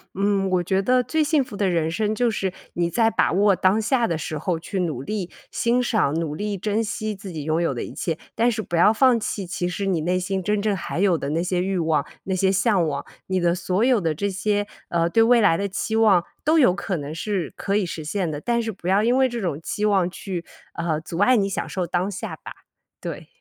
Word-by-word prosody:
嗯， 195 0 +1
我 180 -1 +1
觉 190 +2 +1
得 250 +5 +3
最 310 +6 0
幸 300 -1 +2
福 230 - -10
的 200 -1 +1
人 165 -3 +1
生 210 +5 0
就 240 +2 +1
是 195 -3 -1 0.2
你 170 0 0
在 225 +5 +3
把 - - +1
握 200 +1 +4
当 190 +4 +2
下 240 +2 +2
的 170 -7 -1
时 155 0 -4
候 165 +2 -1
去 190 +3 -4
努 155 -8 -2
力 190 +4 -4 0.2
欣 240 +1 +1
赏、 220 - +1
努 155 -3 -3
力 205 +3 -3
珍 210 +3 0
惜 215 -1 -3
自 195 -1 -9
己 155 -3 -5
拥 160 +2 0
有 165 -5 +1
的 120 - -4
一 - - -8
切。 165 -3 -2 0.2
但 235 +2 +3
是 220 -1 -2
不 175 - -4
要 175 +5 +6
放 250 +2 +4
弃， 205 -3 -4
其 175 0 -2
实 195 +2 -3
你 185 -5 0
内 180 +3 +1
心 190 +1 -2
真 210 +2 0
正 210 -1 +1
还 175 -1 -4
有 190 -3 +3
的 140 - -4
那 160 +3 0
些 180 0 0
欲 190 +1 -1
望、 160 -4 +1 0.2
那 190 - -2
些 190 +1 +2
向 195 -2 +2
往， 145 -3 -3 0.2
你 185 -1 0
的 175 -1 +2
所 185 +3 0
有 250 -4 +3
的 165 -3 0
这 200 +7 -2
些， 205 +1 -1 0.2
呃， 170 0 +1
对 225 +6 +4
未 240 +1 +5
来 205 -7 +4
的 200 - -1
期 220 +3 -2
望 205 -6 +4 0.2
都 315 +2 +4
有 250 -11 +5
可 190 -2 -3
能 145 +1 -6
是 185 -2 -3
可 200 - -2
以 205 - +1
实 165 -2 -5
现 175 +3 -2
的， 150 -1 -5
但 235 +4 +1
是 225 -1 -3
不 180 -2 -9
要 195 +2 +4
因 240 +3 +3
为 265 -1 +4
这 240 -1 -4
种 175 -8 -2
期 210 +5 -2
望 195 -4 +3
去， 185 -2 -5 0.3
呃， 165 -2 -1
阻 165 +2 -6
碍 245 +5 +5
你 200 -2 +2
享 195 - -3
受 185 -2 -2
当 180 +3 0
下 190 -2 -5
吧， - - -10 0.5
对。 - - -6
195 Hz, 270 characters per minute, -23 LUFS, 170-215 Hz, 0.5 s, 要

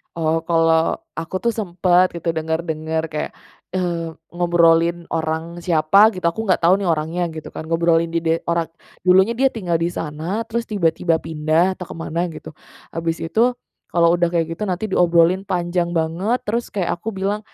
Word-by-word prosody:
oh, 165 -1 +1
kalau 165 -1 +3 0.2
aku 165 +3 -6
tuh 235 - +2
sempet 180 -1 +3
gitu 170 0 -1
denger-denger 160 0 -2
kayak, 150 - -3 0.4
eee, 170 -3 -2 0.2
ngobrolin 170 -1 +3
orang 160 +1 -2
siapa 175 +4 +5
gitu, 185 - -7
aku 170 - -9
nggak 185 - +2
tahu 180 +4 +5
nih 195 - -2
orangnya 165 +2 -1
gitu 155 - -8
kan. 160 - -7
Ngobrolin 165 0 +2
dide 165 0 +1
orang, 170 -1 0 0.3
dulunya 190 +5 +4
dia 265 +1 +2
tinggal 180 -7 -2
di 165 +1 0
sana, 170 +8 -4
terus 235 +1 -2
tiba-tiba 165 -3 +1
pindah 160 +4 +1
atau 185 - -7
ke - - -7
mana 165 +1 -3
gitu, 155 - -10 0.4
habis 165 0 -2
itu, 225 +10 +2 0.4
kalau 170 0 +4
udah 175 0 +2
kayak 165 -2 +1
gitu 210 - -5
nanti 190 +1 -2
diobrolin 175 +1 +3
panjang 175 -2 -1
banget, 175 +8 0
terus 235 +3 -1
kayak 190 -4 -1
aku 225 - -4
bilang, 195 +2 -1
170 Hz, 170 wpm, -20 LUFS, 165-185 Hz, 0.4 s, siapa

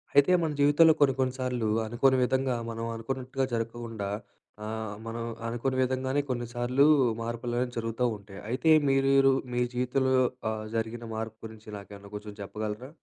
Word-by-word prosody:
అయితే, 145 +5 +6
మన 160 -2 0
జీవితంలో 145 +3 +6
కొన్ని 140 -2 +5
కొన్నిసార్లు, 125 -3 -1 0.2
అనుకోని 130 +4 +3
విధంగా, 130 0 +1 0.2
మనం 115 0 -4
అనుకున్నట్టుగా 130 +3 -2
జరక్కుండా 115 -2 -3 0.6
ఆహ్, 110 -1 -4
మనం 115 +1 -4 0.2
అనుకోని 120 +3 -1
విధంగానే 130 +2 0
కొన్నిసార్లు 120 +2 +1 0.3
మార్పులనేవి 120 +2 -2
జరుగుతా 115 +2 -1
ఉంటాయి. 100 -1 -11
అయితే 130 +7 +1 0.2
మీరు, 135 0 +4 0.2
మీ 120 - +1
జీవితంలో 130 +2 +1 0.4
ఆహ్, 110 0 -4
జరిగిన 115 +1 -2
మార్పు 110 0 -5
గురించి 110 -1 -11
నాకేమన్నా 100 0 -11
కొంచెం 105 0 -7
చెప్పగలరా? 105 +4 -5
120 Hz, 135 wpm, -28 LUFS, 110-130 Hz, 0.6 s, అయితే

